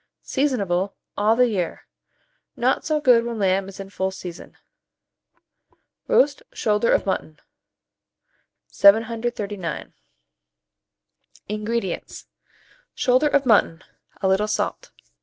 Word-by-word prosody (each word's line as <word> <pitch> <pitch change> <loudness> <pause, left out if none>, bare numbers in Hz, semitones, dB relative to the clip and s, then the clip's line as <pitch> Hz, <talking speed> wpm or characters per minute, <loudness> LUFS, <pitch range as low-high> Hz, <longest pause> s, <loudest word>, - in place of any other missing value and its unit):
Seasonable 200 -9 -1 0.2
all 215 +2 +3
the 250 +1 +4
year; 190 -7 -3 0.7
not - - +1
so 310 -1 0
good 245 -5 +5
when 235 -1 -4
lamb 195 -1 +1
is 195 - -12
in 195 0 -8
full 190 -1 -1
season. 180 -2 -10 1.5
ROAST 285 +1 +3
SHOULDER 210 +1 +1
OF - - +2
MUTTON. 155 -5 -3 1.3
739. 215 -3 +1 1.6
INGREDIENTS. 215 -2 -4 0.7
Shoulder 255 +4 +3
of 280 -1 +2
mutton; 195 -7 +3 0.4
a - - +3
little 190 +3 +2
salt. 215 - -2
210 Hz, 100 wpm, -23 LUFS, 190-235 Hz, 1.6 s, good